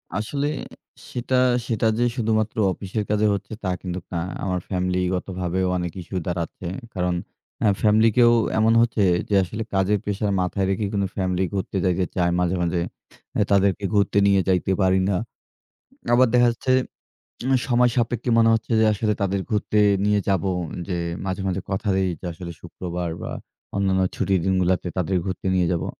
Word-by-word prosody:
আসলে 140 +7 -1 0.6
সেটা, 125 +1 -2 0.3
সেটা 110 -2 +1
যে 120 - +3
শুধুমাত্র 110 -2 0 0.2
অফিসের 100 +3 -3
কাজে 105 0 +2
হচ্ছে, 100 +2 -5
তা 95 - -1
কিন্তু 90 -1 -4
না। 85 - -1 0.2
আমার 90 -2 -1
ফ্যামিলিগতভাবেও 90 0 -1
অনেক 90 -1 -3
ইস্যু 90 +2 -5
দাঁড়াচ্ছে। 85 0 -4 0.3
কারণ 90 -1 0 0.5
আ - - +5
ফ্যামিলি 110 +1 +5
কেও 120 -1 +6 0.3
এমন 110 +1 +4
হচ্ছে 115 -3 +2 0.3
যে, 100 - +2
আসলে 105 +5 -4
কাজের 95 +2 +2
প্রেশার 100 0 -1
মাথায় 95 +1 -1
রেখে, 95 +2 0
কিন্তু 100 -2 0
ফ্যামিলি 95 -1 0
ঘুরতে 95 0 -2
যাইতে 90 0 +1
চায় 85 -1 +2
মাঝে, 90 +1 +1
মাঝে। 85 0 0 0.6
এ - - +5
তাদেরকে 100 0 +3
ঘুরতে 100 0 +2
নিয়ে 100 -1 +4
যাইতে 95 +1 +1
পারি 95 0 +3
না। 95 - +1 1.0
আবার 130 +1 +6
দেখা 120 0 +6
যাচ্ছে 130 +2 -1 0.7
উম 135 - +1 0.2
সময় 125 0 +4
সাপেক্ষে 120 0 0
মনে 115 0 +5
হচ্ছে 115 +1 -2
যে, - - +5
আসলে 105 +1 0
তাদের 100 0 0
ঘুরতে 105 0 0 0.3
নিয়ে 105 0 +3
যাব। 95 0 +2 0.5
যে 90 - -1 0.3
মাঝে, 95 0 -2
মাঝে 95 0 -1
কথা 95 +2 -2
দেই 95 -1 +1
যে - - -14
আসলে 85 +1 -8
শুক্রবার 90 -1 -5
বা - - -4 0.5
অন্যান্য 95 -1 +2
ছুটির 95 -3 +1
দিনগুলাতে 95 -1 +1
তাদের 90 +1 0
ঘুরতে 95 0 -4
নিয়ে 90 -2 +2
যাবো। 85 - -1
95 Hz, 165 wpm, -23 LUFS, 90-110 Hz, 1.0 s, কেও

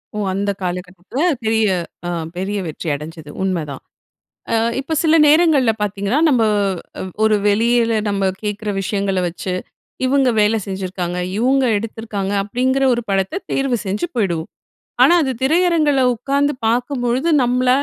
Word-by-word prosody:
ஓ! - - -3 0.2
அந்த 200 +1 -1
காலகட்டத்தில 180 - -4 0.2
பெரிய 220 0 +2 0.4
அ - - -2 0.3
பெரிய 195 +3 -2
வெற்றி 160 +2 -6
அடைஞ்சது, 155 +1 -9
உண்மதான். 160 -8 -3 0.7
அ - - +3 0.2
இப்ப 315 +3 -3
சில 320 0 +3
நேரங்கள்ல 300 -6 +4
பார்த்தீங்கன்னா 205 +5 -1
நம்ப 250 -5 +3 0.6
அ - - -3 0.2
ஒரு 215 -1 +4
வெளியில 230 +2 +3 0.2
நம்ப 200 -1 0 0.2
கேட்கிற 210 0 -3
விஷயங்கள 195 -1 -1
வச்சு, 180 +2 -4 0.5
இவங்க 270 -1 +3
வேலை 215 +2 +3
செஞ்சிருக்காங்க, 185 -2 -4 0.2
இவங்க 265 +3 +3
எடுத்திருக்காங்க, 210 -2 -4
அப்படிங்கற 260 +5 0
ஒரு 240 - -2
படத்த 195 - -1
தேர்வு 270 -4 0
செஞ்சு 205 - -2
போயிடுவோம். 175 -7 -1 0.5
ஆனா 345 - +6
அது 265 - -1
திரையரங்கில 310 -2 +3
உட்கார்ந்து 280 +5 0
பார்க்கும்பொழுது 245 +4 0
நம்மள 250 +1 +1
225 Hz, 130 wpm, -19 LUFS, 195-265 Hz, 0.7 s, ஆனா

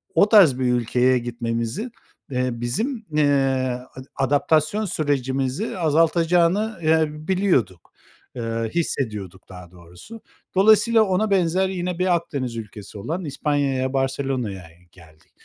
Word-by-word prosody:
o 205 - +4
tarz 175 - +6
bir 130 - 0
ülkeye 125 +2 +2
gitmemizin, 120 - -3 0.4
eee, 125 0 0
bizim, 220 - -2
eee, 150 0 +2
a 130 -3 0 0.3
adaptasyon 155 +8 +1
sürecimizi 140 - -2
azaltacağını, 170 +5 +2
eee, 160 0 +3 0.2
biliyorduk, 175 - 0 0.4
eee, 115 -1 -3
hissediyorduk 105 - -3
daha 90 -2 -12
doğrusu. 90 - -13 0.3
Dolayısıyla 220 +3 +5
ona 200 +1 0
benzer 185 0 +2
yine 180 -1 -4
bir 180 -1 +2
Akdeniz 135 -8 -4
ülkesi 105 -2 -9
olan 165 - -4
İspanya'ya 140 -2 -1
Barcelona'ya 130 -7 -2 0.3
geldik. 80 -3 -20
140 Hz, 115 wpm, -22 LUFS, 120-180 Hz, 0.4 s, tarz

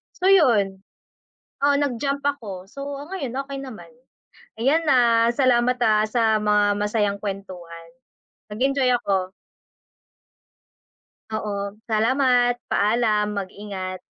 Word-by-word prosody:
so 370 - -1
'yon. 205 - +3 0.8
Oo, 285 0 +4
nag-jump 280 +1 -1
ako. 205 -10 -4
So, 275 +3 -8 0.3
ngayon 280 -11 -5
okey 275 0 -6
naman. 260 - -10 0.7
Ayan 295 +8 +2
ha, 235 -2 +4
salamat 250 -1 +2
ha, 215 -1 +3
sa 220 -1 +2
mga 205 -1 +2
masayang 210 -1 0
kuwentuhan. 180 -4 -7 0.6
Nag-enjoy 265 +2 +1
ako. 190 -4 -1 2.0
Oo. 205 -1 -4
Salamat. 245 +2 +2
Paalam, 210 -1 +1
mag-ingat. 190 -1 -6
220 Hz, 100 wpm, -23 LUFS, 200-255 Hz, 2.0 s, Oo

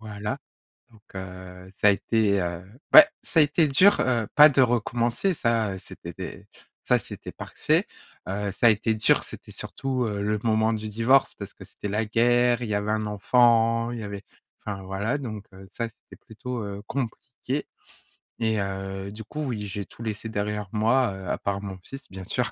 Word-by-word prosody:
voilà, 105 -1 -5 0.5
donc 110 -2 -21
heu, 95 0 -9
ça 105 - +6
a - - +8
été, 100 -1 +1
heu, 85 0 -3 0.3
beh 310 - +13
ouais, 305 - +7 0.2
ça 165 - +2
a - - +9
été 150 +2 +3
dur, 190 +9 +6
heu, 120 -4 +1
pas 150 +1 +10
de 135 -2 +2
recommencer, 120 - +1
ça, 115 - 0
c'était - - -9
des - - -8 0.4
ça, - - +3
c'était - - -8
parfait. - - 0 0.4
Heu, 100 +1 -2
ça 120 - +7
a - - +8
été 110 +1 +1
dur 110 - +3
c'était - - -10
surtout, 130 -2 -3
heu, 100 -1 -3
le 105 +1 0
moment 110 0 +2
du 110 0 -3
divorce 115 +6 +3
parce - - -8
que - - -12
c'était 105 - -7
la 105 +2 0
guerre, 120 +2 +3
il 115 - -3
y 105 - -1
avait 105 +1 -1
un 110 0 -1
enfant, 115 +2 +3
il 120 - -5
y - - -6
avait 100 0 -6 0.4
enfin, 100 -2 -5
voilà, 100 +9 -2
donc 110 -6 -6
heu, 95 +1 -13
ça, 115 - -2
c'était 115 - -18
plutôt, 125 +1 -6
heu, 100 0 -6
compliqué. 130 +2 -4 0.7
Et 110 -2 +1
heu, 95 0 -4
du 110 +2 -9
coup, 150 +8 -5
oui, 105 -5 -3
j'ai 100 0 -5
tout 115 - -13
laissé 110 0 -4
derrière 105 -1 -3
moi, 115 +2 +2
heu, 95 -1 -8
à - - -1
part 100 0 -2
mon 100 -1 -6
fils, 135 +6 -10
bien 95 0 -8
sûr. - - -1
110 Hz, 195 wpm, -25 LUFS, 100-120 Hz, 0.7 s, beh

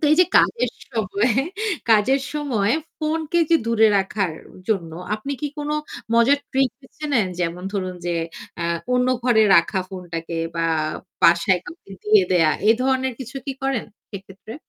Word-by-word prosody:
তো - - -1
এই - - +4
যে - - +7
কাজের 470 - +2 0.2
সময় 220 0 0 0.6
কাজের 250 +6 +4
সময় 240 -8 0 0.3
ফোন 315 +1 -1
কে 345 - +4
যে 330 - +7
দূরে 225 -1 +4
রাখার 195 -2 -1 0.4
জন্য 170 -7 -1 0.2
আপনি 220 +6 -5
কি 295 - -2
কোনো 295 +1 -2 0.4
মজার 240 +5 +5
ট্রিক 265 -1 +2
বেছে 280 +3 -12
নেন? 215 -8 +2
যেমন 175 +1 -2
ধরুন 185 -2 -3
যে 175 - 0 0.5
আ - - -1 0.3
অন্য 250 0 +2 0.2
ঘরে 235 -3 +4
রাখা 170 +3 +3
ফোনটাকে 170 -3 -6 0.2
বা 165 0 +1 0.6
বাসায় 170 +2 +4
কাউকে 335 - -12
দিয়ে 210 -2 +5
দেয়া 165 -3 +4 0.2
এ - - +8
ধরনের 260 -1 +1
কিছু 260 +2 -7
কি 275 - -2
করেন 270 -4 -1 0.3
সেক্ষেত্রে? 195 +2 -10
220 Hz, 160 wpm, -22 LUFS, 185-265 Hz, 0.6 s, এ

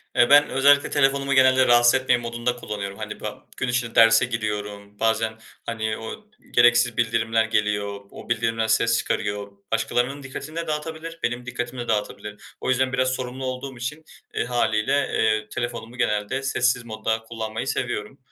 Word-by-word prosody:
E, 120 - +5
ben 145 +1 +7
özellikle 140 +2 +4
telefonumu 140 0 +2
genelde, 130 -1 +5
”Rahatsız 120 0 +6
etmeyin” 130 -2 +2
modunda 120 +1 -2
kullanıyorum. 100 -4 -6
Hani, 105 -1 -6
ba 105 -1 -7
gün 130 - -1
içinde 120 -2 -1
derse 115 +1 +6
giriyorum, 105 -3 -5
bazen, 110 0 0 0.3
hani, 110 -1 -2
o 110 - -8 0.3
gereksiz 120 -1 +4
bildirimler 115 -1 +1
geliyor, 105 -2 -1
o - - -12
bildirimler 115 -1 0
ses 115 +1 +3
çıkarıyor. 100 -2 -2 0.2
Başkalarının 125 +5 0
dikkatini 140 +3 -8
de 165 -1 -3
dağıtabilir, 160 +2 -5
benim 120 +1 -2
dikkatimi 125 0 -5
de 120 - -6
dağıtabilir. 105 -1 -3 0.2
O - - -2
yüzden 130 +1 +1
biraz 130 -1 +2
sorumlu 130 +1 -5
olduğum 130 0 -5
için 150 +6 -5 0.3
e, - - 0
hâliyle, 120 +1 +1 0.2
eee, 110 -1 +1
telefonumu 120 0 -5
genelde 105 +3 -1
sessiz 125 -2 +1
modda 110 0 -2
kullanmayı 115 +1 -5
seviyorum. 120 0 -3
120 Hz, 155 wpm, -24 LUFS, 110-130 Hz, 0.3 s, ben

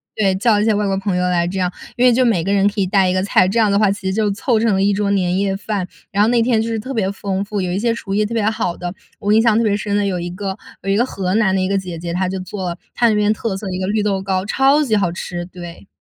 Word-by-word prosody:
对， 195 -3 +2
叫 215 +2 +3
了 205 - +2
一 - - +1
些 220 - +3
外 205 0 0
国 195 -1 0
朋 195 -1 -1
友 180 0 +1
来 175 -1 +1
这 190 +1 -3
样， 180 0 0 0.2
因 250 +1 +2
为 250 - +7
就 255 +2 +3
每 195 -9 +2
个 195 - -1
人 200 0 +3
可 205 0 -1
以 - - +2
带 190 0 +2
一 - - +1
个 185 0 0
菜， 185 -2 +3
这 210 +5 -1
样 215 -3 +3
的 200 - +3
话 210 -2 +4
其 200 0 -4
实 190 - 0
就 215 0 +1
凑 220 +3 0
成 225 -2 +2
了 190 - +1
一 205 - +3
桌 200 0 0
年 185 -2 +1
夜 195 -1 0
饭。 200 -2 -3 0.2
然 200 +1 +1
后 210 - +4
那 235 0 +3
天 230 -1 +2
就 225 - -2
是 225 - -2
特 255 +5 -5
别 200 -5 0
丰 195 0 -3
富， 205 -1 -3
有 180 -1 -2
一 190 - -1
些 230 +1 +1
厨 195 -4 -5
艺 210 +1 +2
特 230 - -5
别 225 -2 0
好 180 -5 -2
的， 175 0 -5 0.3
我 205 +1 0
印 220 - +5
象 225 -2 +3
特 230 - +2
别 205 -2 +1
深 205 -1 -2
的 205 -1 +1
有 185 -3 -1
一 175 - -4
个 190 +1 -5 0.3
有 195 - -3
一 195 - +2
个 240 - +3
河 190 -6 -3
南 200 -4 +2
的 190 - +1
一 185 - 0
个 200 - +1
姐 180 -3 -5
姐， 170 +1 -5
她 185 +2 0
就 190 +1 -3
做 185 -2 -5 0.2
她 240 - +3
那 220 - +2
边 210 0 +2
特 215 -2 -2
色 200 - -7
的 - - -4
一 185 - -3
个 185 - -2
绿 210 +1 0
豆 195 -2 0
糕， 190 0 -1
超 275 +6 +3
级 220 -6 +1
好 185 -4 +1
吃， 175 0 -5
对。 175 +1 -11
200 Hz, 365 characters per minute, -19 LUFS, 185-215 Hz, 0.3 s, 为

